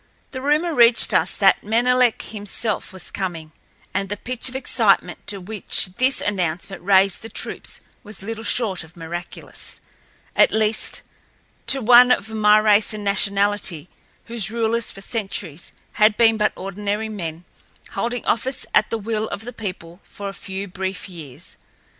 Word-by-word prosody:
The 260 - -6
rumor 305 +5 +1
reached 235 -3 +6
us - - +3
that - - +4
Menelek 245 +2 +2
himself 210 +1 -3
was 190 -1 -6
coming, 170 -5 -5 0.4
and 195 0 -2
the 205 - -3
pitch 250 +4 -2
of 255 - -11
excitement 215 -9 +1
to 200 -1 -3
which 205 +2 +3
this 260 +2 +3
announcement 185 -1 -2
raised 195 0 +3
the 225 - -9
troops - - -5 0.2
was 210 -4 -8
little 225 +1 -5
short 210 -8 0
of 165 +2 -17
miraculous—at 170 +1 -3
least, 220 0 +2 0.6
to 270 -2 +1
one 245 +2 +7
of 220 -3 +1
my 210 -1 +5
race 215 0 +3
and 210 - -6
nationality 200 -4 +1 0.4
whose 230 -4 +2
rulers 230 0 0
for 195 - -11
centuries 195 -7 -4 0.2
had 215 0 +3
been 225 -1 +5
but 210 -1 +1
ordinary 205 +3 -3
men, 175 -5 -6 0.5
holding 240 +1 -3
office 255 +4 0
at - - +3
the 225 - -1
will 220 0 -3
of - - -5
the 245 - -7
people 180 -5 -7
for 200 -1 -6
a - - -8
few 195 0 -6
brief 190 +1 -5
years. 155 -8 -9
210 Hz, 155 wpm, -21 LUFS, 190-230 Hz, 0.6 s, one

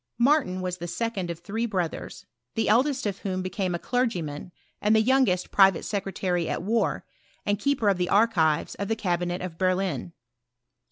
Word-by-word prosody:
Martin 245 -8 +2
was 180 0 -3
the 175 - -5
second 200 -2 -3
of 170 - -4
three 215 +7 -3
brothers, 180 -6 -4 0.3
the 225 - 0
eldest 255 +5 +2
of 200 -2 -2
whom 185 -2 -3
became 185 -1 -2
a - - 0
clergyman, 180 - -2 0.3
and 210 +1 +3
the - - +6
youngest 245 -8 +2
private 195 -3 +5
secretary 190 -4 -1
at - - -2
war, 225 +4 0 0.4
and 205 -1 0
keeper 280 -5 +1
of 195 -2 +3
the 180 0 -1
archives 180 -8 +3
of 200 - -4
the 225 - 0
cabinet 175 -3 -1
of 170 -3 -7
Berlin. 185 - 0
190 Hz, 170 wpm, -26 LUFS, 175-225 Hz, 0.4 s, the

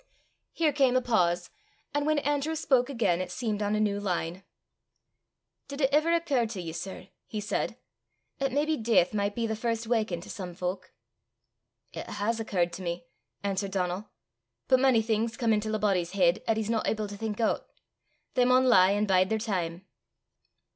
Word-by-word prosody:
Here 315 -3 +1
came 265 -3 +3
a 255 - +4
pause, 175 -7 +1 0.4
and 290 +1 0
when 310 -1 +3
Andrew 290 +2 0
spoke 260 -4 +2
again, 205 -10 +1
it 185 - -4
seemed 215 0 -2
on 205 0 +1
a - - +1
new 205 -1 +1
line. 180 -2 -2 1.2
"Did 280 0 -7
it 270 0 +3
ever 310 +3 +4
occur 300 -9 +2
to 215 -3 -6
ye, 170 -2 -5
sir," 180 +3 -7 0.2
he 215 - -4
said, 210 +2 -2 0.6
"'at 275 -1 0
maybe 300 +3 +1
deith 220 -5 +3
micht 205 -1 -1
be 235 - -1
the 220 -1 -1
first 230 +1 -2
waukin' 220 -7 0
to - - -12
some 180 -5 -6
fowk?" 185 +1 -4 1.0
"It - - -6
has 210 +3 -1
occurrt 180 -6 0
to 185 - -6
me," 170 -1 -4 0.4
answered 200 0 -1
Donal; 185 +2 -2 0.6
"but 260 - +5
mony 255 -4 +4
things 225 +1 -1
come 230 -2 +2
intil 215 +1 0
a - - +1
body's 190 -4 0
heid 185 +1 +3
'at 225 - +2
he's 220 -2 -1
no 225 -2 +1
able 215 -1 -1
to 205 - -7
think 215 +1 -4
oot! 225 - +1 0.7
They 250 - +3
maun 255 +1 +4
lie 195 -6 +6
an' 205 +1 +1
bide 185 -2 +3
their 220 - +1
time." 185 -5 -3
215 Hz, 185 wpm, -28 LUFS, 185-245 Hz, 1.2 s, lie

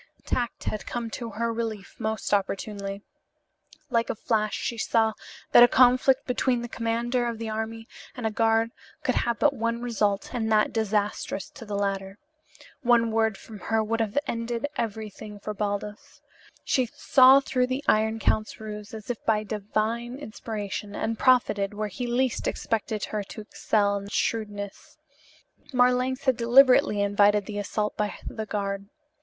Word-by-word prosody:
Tact 240 -2 -2
had 215 - -4
come 235 -2 -4
to 235 0 -5
her 230 +2 -2
relief 220 -3 -4
most 220 -1 -2
opportunely. 200 0 -2 0.9
Like 230 -2 +1
a - - -1
flash 215 -2 0
she 235 - -3
saw 220 -1 +2 0.4
that - - +8
a 240 - +10
conflict 255 +2 +4
between 250 -1 0
the - - -4
commander 235 +2 -1
of 235 -1 -3
the 225 0 -4
army 220 +1 -4 0.3
and 245 - -5
a 220 - +1
guard 225 +1 +2 0.3
could - - +1
have 235 -1 0
but 285 +5 +3
one 230 -2 -1
result 210 -4 0
and 220 -3 -1
that 215 -1 +3
disastrous 210 -3 -1
to 235 - -11
the 205 -1 -4
latter. 195 -1 -2 0.6
One 235 -3 +3
word 220 -2 +1
from 215 -2 -11
her 225 -1 +2
would 225 +1 -1
have 220 +3 -2
ended 230 +2 -2
everything 215 -2 -5
for 210 +1 -5
Baldos. 205 0 -4 0.4
She 255 -2 +1
saw 260 +3 +6
through 255 -2 0
the 260 +3 -2
Iron 220 +1 +3
Count's 215 -1 0
ruse 210 0 -7
as 220 +2 -5
if 235 - -7
by 215 -1 +2
divine 215 +4 -2
inspiration 210 -5 -5
and 225 0 -2
profited 210 -6 +3
where 210 0 -2
he 225 +6 -4
least 245 +1 0
expected 220 -1 -2
her 215 - -3
to 215 - -8
excel 205 -1 0
in 200 0 -7
shrewdness. 205 -2 -3 0.7
Marlanx 250 +1 +2
had 260 -4 +2
deliberately 250 -2 +5
invited 205 0 +3
the 205 0 -4
assault 210 +1 -2
by 210 -1 -1
the 220 -1 -5
guard. 200 -1 -3
220 Hz, 160 wpm, -26 LUFS, 210-235 Hz, 0.9 s, a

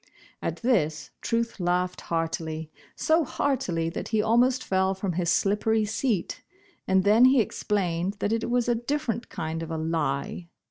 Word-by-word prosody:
At - - -4
this 155 - +1
Truth 230 -1 -1
laughed 180 +1 0
heartily, 160 -1 -3 0.2
so 320 +1 +2
heartily 245 - -1
that 165 - -5
he 220 - 0
almost 245 +4 +3
fell 190 0 +1
from 190 -1 -2
his 175 0 0
slippery 215 +2 +2
seat, 220 -2 -1 0.5
and 190 0 +3
then 215 +5 +6
he 260 0 +6
explained 190 -4 -1
that 205 +1 -1
it 230 +1 -1
was 245 0 +1
a 240 - +3
different 240 -1 -2
kind 160 0 -4
of 165 - -5
a 160 - -3
"lie." 160 +1 -2
200 Hz, 155 wpm, -26 LUFS, 165-235 Hz, 0.5 s, then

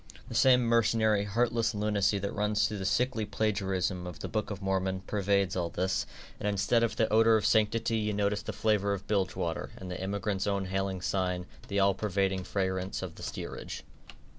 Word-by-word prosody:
The - - -6
same 125 -1 +5
mercenary, 110 -3 +3
heartless 115 +2 +1
lunacy 105 -1 +1
that 100 0 -3
runs 105 0 +1
through 105 -2 -5
the 95 - -4
sickly 125 0 +1
plagiarism 95 -4 -1
of 90 - -7
the - - -5
Book 110 +2 -2
of 100 -3 -5
Mormon, 95 -1 -1
pervades 100 -2 0
all 85 -2 -1
this, 95 +3 -1 0.3
and 105 - -1
instead 100 +4 +2
of 115 - +1
the 110 - +2
odor 115 0 +6
of 105 - -2
sanctity 115 +1 +2
you 105 0 0
notice 100 0 0
the - - -5
flavor 105 -2 +1
of 100 -1 -5
bilge 100 -3 0
water, 85 -1 -3
and 90 -1 -7
the 90 - -5
emigrant's 100 0 -2
own 100 -1 0
hailing 95 0 -2
sign, 90 -1 -1 0.2
the 100 0 0
all 100 0 +4
pervading 95 -1 0
fragrance 95 -1 -2
of - - -5
the - - -13
steerage. - - -6
100 Hz, 190 wpm, -30 LUFS, 95-110 Hz, 0.3 s, odor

